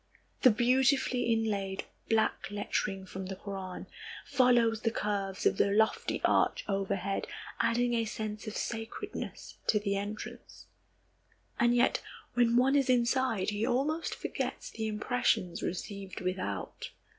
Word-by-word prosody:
The 255 - +8
beautifully 250 +1 +3
inlaid 200 -4 0 0.3
black 220 -3 +1
lettering 200 -1 -2
from 190 0 -6
the 190 - -4
Koran 190 -2 -6 0.4
follows 240 -4 +4
the 225 - +2
curves 200 -3 -2
of - - +4
the - - +3
lofty 220 +2 +2
arch - - +2
overhead, 195 -1 -1 0.3
adding 240 +1 +2
a 230 -1 +1
sense 215 0 -5
of 215 - -4
sacredness 225 -1 -5
to 210 - +4
the 200 -1 -1
entrance. 205 +2 -6 0.9
And 240 0 +4
yet, 245 - +3 0.3
when 240 -1 +4
one 265 +3 +4
is 275 -2 +3
inside, 240 -4 +2
he 205 +1 -2
almost 295 +8 0
forgets - - -4
the 220 -1 -3
impressions 210 -4 0
received 195 +1 -4
without. 180 - -3
220 Hz, 130 wpm, -31 LUFS, 195-240 Hz, 0.9 s, The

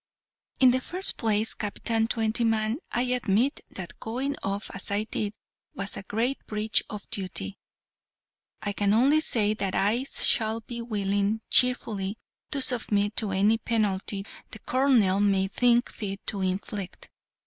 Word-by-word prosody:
"In 255 -1 +7
the 255 +1 +1
first 365 +8 -1
place, 220 0 +1
Captain 225 +2 -1
Twentyman, 225 +1 0
I 240 - +1
admit 250 +1 +1
that 180 -3 -8
going 265 +5 -2
off 200 +1 -3
as 195 - +1
I 205 +1 0
did 215 -1 -2 0.4
was 195 0 +1
a - - -5
great 230 +7 -1
breach 215 0 +1
of 210 -1 -7
duty. 185 - -4 1.0
I 205 - -2
can 205 0 +2
only 275 +7 +5
say 215 -8 +2
that 195 -3 -2
I 225 +6 +1
shall 225 -4 +1
be 235 +1 -6
willing, 205 -1 0
cheerfully, 220 -5 +2 0.3
to 280 - -2
submit 210 -5 +1
to 215 -3 +1
any 205 +4 +3
penalty 200 -3 -1 0.2
the - - -8
colonel 235 -5 +3
may 195 -2 +3
think 240 +3 +2
fit 195 -2 -6
to 200 - -1
inflict. 190 +1 -4
215 Hz, 145 wpm, -27 LUFS, 200-235 Hz, 1.0 s, In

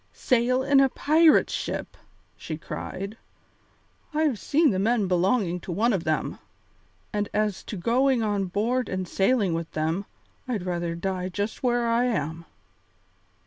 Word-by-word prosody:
"Sail 255 +1 +1
in 275 0 +4
a 270 -1 +5
pirate 315 +4 +4
ship?" - - -4 0.4
she 155 - -6
cried. 195 +6 -6 1.0
"I've 300 -8 +1
seen 300 -1 +3
the 185 - -1
men 215 0 +2
belonging 180 0 +1
to 180 - -7
one 225 +7 +2
of 180 -4 -2
them, 155 -1 -1 0.7
and 205 -1 -1
as 210 -2 0
to 210 - -5
going 245 +5 +2
on 205 -2 0
board 230 +7 -1
and 185 -1 -3
sailing 195 0 +2
with 165 0 -3
them, 160 +5 -1 0.4
I'd 220 -8 -2
rather 175 -2 -2
die 185 +1 -3
just 205 +4 -3
where 240 -2 +1
I 230 +1 +2
am." 165 - -2
205 Hz, 145 wpm, -26 LUFS, 180-245 Hz, 1.0 s, a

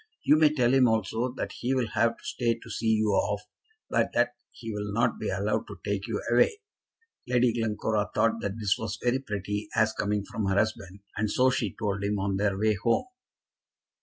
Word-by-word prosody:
You 150 - +6
may 155 -1 +5
tell 125 -4 +2
him 130 -2 +5
also 110 +2 0
that - - -3
he 130 +2 0
will 125 -4 0
have 115 0 +1
to - - -21
stay 120 -2 0
to 115 - -13
see 110 - -2
you 110 -1 +3
off, 105 +1 +1 0.4
but - - +1
that - - +4 0.2
he 115 -2 -7
will 105 0 -4
not 115 +3 +1
be - - -2
allowed 100 +3 -1
to - - -9
take 100 +1 -2
you 115 -3 -2
away." 120 - +4 0.7
Lady 125 -1 +3
Glencora 110 -2 -1
thought 115 0 +2
that 100 +1 -3
this 105 -3 0
was 115 -1 -4
very 125 +2 +2
pretty 105 -3 -4
as 110 -1 +3
coming 105 -1 -1
from 110 -3 -3
her 95 - +1
husband, 100 -2 -1 0.2
and 105 0 0
so 130 +5 +3
she 110 -7 -2
told 100 -1 -2
him 100 +1 0
on 95 0 -1
their 100 -1 +1
way 110 +1 +2
home. 115 - +2
110 Hz, 205 wpm, -28 LUFS, 100-120 Hz, 0.7 s, You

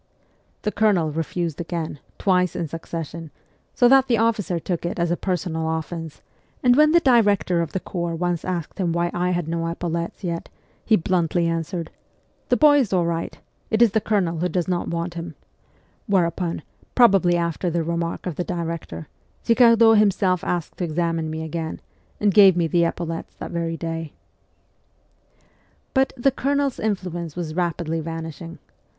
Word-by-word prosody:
The 210 - 0
Colonel 200 -8 +2
refused 165 +1 -3
again, 165 -3 -4 0.2
twice 180 -2 +2
in 170 - -2
succession, 165 0 -6 0.5
so 245 - +5
that 270 +1 +5
the 235 - +2
officer 215 -5 +1
took 170 +1 -3
it 175 - -3
as 170 -1 0
a - - +2
personal 170 -3 -2
offence; 160 -1 -7 0.4
and 245 -1 +5
when 305 +2 +5
the 340 - +6
director 205 - +3
of 165 - -3
the 190 - -2
corps 170 -2 -3
once 175 0 -1
asked 180 0 -4
him 175 -3 0
why 170 0 0
I 180 +1 0
had 175 -3 -1
no 165 0 -2
epaulettes 170 +2 -4
yet, 170 -2 -3 0.3
he 220 - +4
bluntly 175 -1 +1
answered, 165 +1 -3 0.3
' - - -41
The - - +3
boy 295 -1 +6
is 245 -7 0
all 180 -3 +2
right; 170 0 -3 0.3
it 220 - +1
is 230 - +4
the 220 - +1
Colonel 180 -7 0
who 180 +2 0
does 180 -2 -1
not 180 -1 -1
want 170 +1 -3
him; 170 0 -7 0.4
' - - -37
whereupon, 175 -4 0 0.3
probably 195 -8 +5
after 170 +1 -1
the 170 0 -1
remark 170 +1 -3
of 175 -5 -4
the 180 - 0
director, 165 - -5 0.4
Girardot 230 -2 +6
himself 190 -3 +2
asked 175 -4 -3
to - - -3
examine 165 -1 -1
me 160 0 -4
again, 160 0 -4 0.4
and 205 -2 +2
gave 195 -3 +7
me 170 - +2
the 170 +1 +2
epaulettes 165 -1 -4
that - - -7
very 165 -1 -2
day. 165 -2 -5 1.8
But 265 0 +2
the 270 +3 +3
Colonel's 280 0 0
influence 180 -6 -3
was 170 -3 -4
rapidly 170 -2 -1
vanishing. 165 +1 -6
175 Hz, 170 wpm, -23 LUFS, 165-195 Hz, 1.8 s, gave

